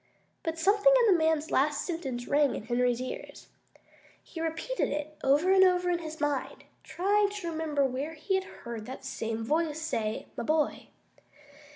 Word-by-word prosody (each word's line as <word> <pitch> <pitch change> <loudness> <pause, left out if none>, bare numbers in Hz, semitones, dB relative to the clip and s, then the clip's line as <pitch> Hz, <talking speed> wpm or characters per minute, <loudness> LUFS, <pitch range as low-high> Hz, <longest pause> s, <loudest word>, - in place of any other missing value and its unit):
But 325 0 -3
something 405 +8 +4
in 415 - +6
the - - +3
man's 315 -1 +1
last 290 +2 +1
sentence 270 -9 -4
rang 290 -1 +3
in - - -5
Henry's 245 0 +1
ears. 255 0 -7 0.7
He 330 - -8
repeated 330 +10 -2
it 295 +1 -4
over 290 +7 +4
and 380 0 +7
over 360 -1 +3
in 345 - 0
his 315 -1 -7
mind, 290 -3 -2 0.2
trying 405 +3 +1
to 400 -5 -5
remember 310 -3 0
where 270 +5 -3
he 385 +6 -3
had 380 0 +1 0.2
heard 230 -2 -6
that 260 +1 -8
same 225 -3 -3
voice 310 +4 0
say 225 -9 -2
"my - - -3
boy." 305 +4 0
310 Hz, 170 wpm, -29 LUFS, 270-345 Hz, 0.7 s, and